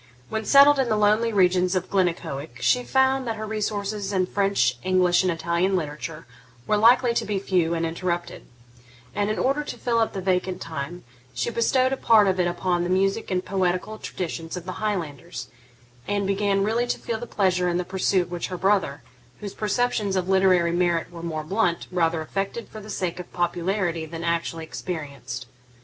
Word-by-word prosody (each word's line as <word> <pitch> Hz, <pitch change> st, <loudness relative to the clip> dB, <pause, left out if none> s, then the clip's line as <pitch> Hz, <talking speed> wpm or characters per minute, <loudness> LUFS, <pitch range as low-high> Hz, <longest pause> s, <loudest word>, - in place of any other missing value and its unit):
When 220 Hz, 0 st, -3 dB
settled 280 Hz, +2 st, +7 dB
in 260 Hz, -3 st, +1 dB
the 215 Hz, -, +2 dB
lonely 215 Hz, +2 st, +3 dB
regions 185 Hz, -2 st, +3 dB
of 185 Hz, 0 st, -2 dB
Glennaquoich, 160 Hz, -9 st, -1 dB
she 250 Hz, -, +2 dB
found 265 Hz, 0 st, +2 dB
that 225 Hz, -, -1 dB
her 215 Hz, 0 st, -5 dB
resources 210 Hz, -1 st, -2 dB
in 185 Hz, -2 st, +1 dB
French, 185 Hz, -11 st, +1 dB
English, 185 Hz, -1 st, +3 dB
and 185 Hz, -1 st, +1 dB
Italian 170 Hz, +3 st, 0 dB
literature 155 Hz, -1 st, -4 dB, 0.4 s
were 210 Hz, -, +2 dB
likely 235 Hz, +3 st, +5 dB
to -, -, 0 dB
be 205 Hz, -2 st, -2 dB
few 180 Hz, -4 st, +1 dB
and 165 Hz, 0 st, -1 dB
interrupted; 175 Hz, +1 st, -3 dB, 0.7 s
and, 205 Hz, 0 st, 0 dB
in 215 Hz, -, -1 dB
order 275 Hz, +3 st, +1 dB
to -, -, -7 dB
fill 235 Hz, -2 st, 0 dB
up 225 Hz, -, +1 dB
the 195 Hz, -, -3 dB
vacant 185 Hz, 0 st, 0 dB
time, 165 Hz, +2 st, -6 dB, 0.3 s
she -, -, -1 dB
bestowed 255 Hz, +3 st, +2 dB
a -, -, -2 dB
part 220 Hz, -5 st, +5 dB
of 190 Hz, -1 st, +1 dB
it 175 Hz, -, +3 dB
upon 175 Hz, 0 st, 0 dB
the 175 Hz, -, -2 dB
music 195 Hz, +4 st, +1 dB
and 185 Hz, -1 st, -1 dB
poetical 190 Hz, +3 st, -1 dB
traditions 165 Hz, -1 st, -5 dB
of 175 Hz, -, -7 dB
the 185 Hz, +2 st, -6 dB
Highlanders, 170 Hz, -8 st, -4 dB, 0.6 s
and 205 Hz, -1 st, 0 dB
began 195 Hz, 0 st, +1 dB
really 230 Hz, +4 st, +1 dB
to -, -, -1 dB
feel 225 Hz, -2 st, -4 dB
the 240 Hz, -, -7 dB
pleasure 180 Hz, -3 st, +1 dB
in 175 Hz, -, 0 dB
the 180 Hz, -, 0 dB
pursuit 185 Hz, -1 st, +1 dB
which 175 Hz, -1 st, -3 dB
her 180 Hz, -, -5 dB
brother, 185 Hz, -8 st, +1 dB, 0.4 s
whose 205 Hz, -2 st, -6 dB
perceptions 210 Hz, -2 st, 0 dB
of 185 Hz, -1 st, 0 dB
literary 190 Hz, -3 st, +4 dB
merit 175 Hz, -1 st, 0 dB
were 170 Hz, -1 st, -9 dB
more 160 Hz, -2 st, -3 dB
blunt, 175 Hz, 0 st, 0 dB
rather 165 Hz, -2 st, +1 dB
affected 195 Hz, +7 st, -4 dB
for 215 Hz, -, -9 dB
the 210 Hz, -, -11 dB
sake 180 Hz, -4 st, -3 dB
of 180 Hz, -, -9 dB
popularity 175 Hz, -1 st, -1 dB
than 165 Hz, +1 st, -7 dB
actually 170 Hz, -1 st, -1 dB
experienced. 140 Hz, -7 st, -6 dB
185 Hz, 190 wpm, -24 LUFS, 170-210 Hz, 0.7 s, settled